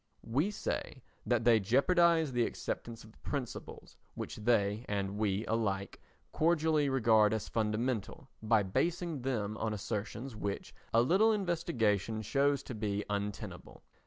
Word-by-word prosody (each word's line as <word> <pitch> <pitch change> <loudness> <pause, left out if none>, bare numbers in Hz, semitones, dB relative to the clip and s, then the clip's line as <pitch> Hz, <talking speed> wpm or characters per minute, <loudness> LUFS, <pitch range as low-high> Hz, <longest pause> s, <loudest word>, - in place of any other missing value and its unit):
We 145 - +1
say 140 - -4 0.2
that 120 -2 +2
they 115 -2 +6
jeopardise 160 - +3
the 120 -1 +2
acceptance 115 -1 -5
of 110 - -14
the - - -24
principles 135 -5 -6 0.2
which - - -6
they 105 -1 +1
and 100 0 -2
we 105 0 0
alike 100 -3 -2 0.3
cordially 155 -3 +2
regard 110 -5 +4
as 110 - -4
fundamental 115 +5 -2
by 110 -1 +3
basing 165 - -1
them 110 -5 -2
on 110 -1 -2
assertions 110 +4 -4
which 100 -1 -4 0.2
a 115 +1 +5
little 195 - +4
investigation 115 - 0
shows 140 +5 +1
to - - -7
be 105 -2 -2
untenable. 100 0 -5
115 Hz, 135 wpm, -32 LUFS, 105-140 Hz, 0.3 s, they